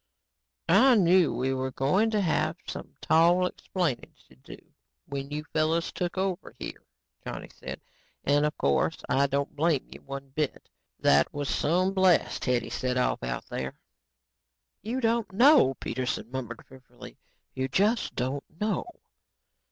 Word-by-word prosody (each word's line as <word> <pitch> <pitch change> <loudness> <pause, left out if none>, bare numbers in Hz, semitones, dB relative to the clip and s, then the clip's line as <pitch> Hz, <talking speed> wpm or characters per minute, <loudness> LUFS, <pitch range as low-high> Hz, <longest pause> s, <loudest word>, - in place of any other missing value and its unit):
"I 245 +8 +6
knew 180 -4 +4
we 130 +1 -1
were 130 0 -2
going 150 - +1
to 215 -2 +1
have 155 -2 0
some - - -8
tall 170 +3 +4
explaining 180 -6 -3
to - - -19
do 65 - -12 0.5
when 140 0 -5
you 150 +1 -4
fellows 160 +2 +1
took 180 0 -3
over 190 -1 -2
here," - - -7 0.4
Johnny - - -7
said, - - -8 0.4
"and, 145 +1 +3
of 150 - -5
course, 70 0 +1
I 140 +1 +3
don't 140 +1 -2
blame 155 -2 +1
you - - -11
one 135 0 -8
bit. 150 +2 -3 0.3
That 70 +1 +3
was 145 -1 -4
some 180 +5 +1
blast 185 -3 +2
Hetty 125 -2 0
set 125 0 -1
off 125 - +1
out - - -4
there." 65 0 -5 1.1
"You 240 +5 -3
don't 230 -3 +1
know," 265 +9 +7
Dr. - - -30
Peterson 125 -1 -3
murmured 120 -3 -6
fearfully, 130 -1 -14 0.3
"you 130 0 -2
just 205 - +1
don't 130 +3 -2 0.2
know." 210 - -1
155 Hz, 150 wpm, -28 LUFS, 130-190 Hz, 1.1 s, know